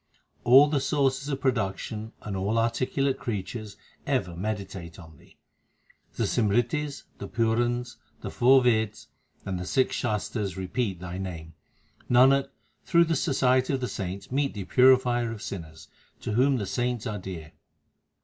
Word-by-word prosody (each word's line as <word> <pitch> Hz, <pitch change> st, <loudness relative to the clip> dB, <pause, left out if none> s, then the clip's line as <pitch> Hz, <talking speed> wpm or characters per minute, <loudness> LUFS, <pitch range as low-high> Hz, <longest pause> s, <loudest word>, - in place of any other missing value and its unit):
All 135 Hz, +4 st, +8 dB
the 145 Hz, -1 st, +1 dB
sources 135 Hz, 0 st, 0 dB
of 135 Hz, -2 st, -3 dB
production 110 Hz, -3 st, -2 dB
and 105 Hz, -2 st, -4 dB
all 100 Hz, +4 st, -1 dB
articulate 130 Hz, +4 st, 0 dB
creatures 110 Hz, -1 st, -5 dB, 0.3 s
ever 105 Hz, -11 st, 0 dB
meditate 95 Hz, -3 st, -5 dB
on 80 Hz, -5 st, -14 dB
Thee. -, -, -22 dB, 0.8 s
The -, -, -1 dB
Simritis, 120 Hz, +7 st, 0 dB, 0.2 s
the 100 Hz, -, -6 dB
Purans, 120 Hz, +3 st, 0 dB, 0.2 s
the -, -, -5 dB
four 130 Hz, +1 st, +5 dB
Veds, 110 Hz, -3 st, +1 dB, 0.4 s
and 95 Hz, -2 st, -3 dB
the 90 Hz, -, -5 dB
six 130 Hz, -1 st, +1 dB
Shastars 105 Hz, -4 st, -2 dB
repeat 95 Hz, 0 st, -2 dB
Thy 90 Hz, 0 st, -6 dB
name. 85 Hz, -4 st, -6 dB, 0.6 s
Nanak, 135 Hz, +3 st, +5 dB, 0.3 s
through 170 Hz, 0 st, +4 dB
the 165 Hz, 0 st, 0 dB
society 130 Hz, -1 st, +2 dB
of 135 Hz, -, 0 dB
the 125 Hz, -, -2 dB
saints 95 Hz, +1 st, -5 dB
meet 140 Hz, -1 st, 0 dB
the 100 Hz, -, -4 dB
Purifier 125 Hz, -1 st, +4 dB
of 110 Hz, -2 st, -7 dB
sinners, 80 Hz, -4 st, -8 dB, 0.3 s
to -, -, -4 dB
whom 130 Hz, +5 st, +3 dB
the 105 Hz, -, -2 dB
saints 120 Hz, +2 st, -2 dB
are 105 Hz, -3 st, -3 dB
dear. 85 Hz, -4 st, -8 dB
115 Hz, 150 wpm, -27 LUFS, 95-130 Hz, 0.8 s, All